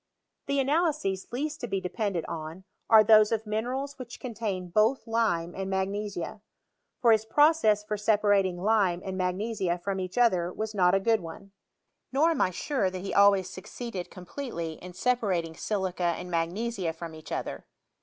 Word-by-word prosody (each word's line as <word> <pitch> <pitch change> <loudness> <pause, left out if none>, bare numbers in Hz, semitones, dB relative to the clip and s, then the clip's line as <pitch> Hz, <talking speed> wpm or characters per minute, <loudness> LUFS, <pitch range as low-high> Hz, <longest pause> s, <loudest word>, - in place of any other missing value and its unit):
The 280 0 +1
analyses 285 - 0
least 295 +4 -3
to 245 - -3
be 195 -2 -1
depended 185 -1 -2
on, 160 +3 -6 0.3
are 220 -1 +9
of - - 0
those 215 0 +6
mine 215 +2 -2
rals 270 +2 -4
which 245 -1 -8
contain 210 -7 -4
both 215 +7 +2
lime 220 -8 0
and 195 0 -4
magnesia; 195 0 -3 0.6
for 235 - +5
his 220 -1 +4
process 225 -4 +4
for 210 0 -3
separating 205 -4 +2
lime 195 -5 +2
and 190 -1 -4
magnesia 185 0 -1
from 195 +2 -3
each 185 +2 -5
other 185 -8 +3
was 220 +3 -4
not 180 -2 +4
a - - +3
good 225 +2 +2
one; 195 +3 -10 0.6
nor 300 +5 +3
am 325 - 0
I - - +3
sure 200 - -1
that 185 0 -6
he 195 - -4
always 200 -2 +5
succeeded 190 +1 -7
completely 180 - -6
in 180 0 -9
separating 185 -8 0
silica 185 -3 -1
and 180 - -7
magnesia 175 +2 -1
from 165 0 -8
each 155 0 -11
other. - - -4
200 Hz, 170 wpm, -28 LUFS, 180-230 Hz, 0.6 s, are